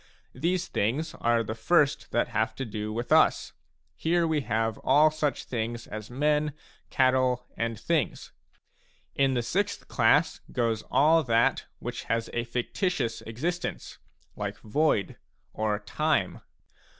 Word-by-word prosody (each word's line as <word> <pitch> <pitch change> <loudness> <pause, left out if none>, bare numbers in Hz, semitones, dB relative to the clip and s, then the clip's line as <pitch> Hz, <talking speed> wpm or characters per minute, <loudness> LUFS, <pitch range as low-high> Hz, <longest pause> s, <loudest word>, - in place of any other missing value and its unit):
These 175 +6 -1
things 150 - -1
are 115 -1 +2
the 110 - -4
first 140 +6 +2
that - - 0
have 110 0 -1
to 135 - -4
do 105 -1 -4
with 120 +2 -4
us; - - +4 0.4
here 170 +1 +1
we 160 -2 +1
have 115 -2 -1
all 155 +2 +5
such 155 -2 -1
things 115 -1 -4
as 110 0 -7
men, 150 +3 +1 0.4
cattle, 130 -1 +2
and 115 -2 -2
things. 155 +2 -1 0.8
In 135 -1 +2
the 120 - 0
sixth 200 - -1
class 140 +7 +3
goes 115 -3 0
all 160 +3 +5
that 115 -1 +2
which - - -6
has 115 0 -1
a 120 0 -1
fictitious 125 - -2
existence, 165 +11 -4 0.4
like - - -4
void, 110 -3 +1 0.4
or 110 -1 0
time. 105 - -1
125 Hz, 135 wpm, -27 LUFS, 115-155 Hz, 0.8 s, all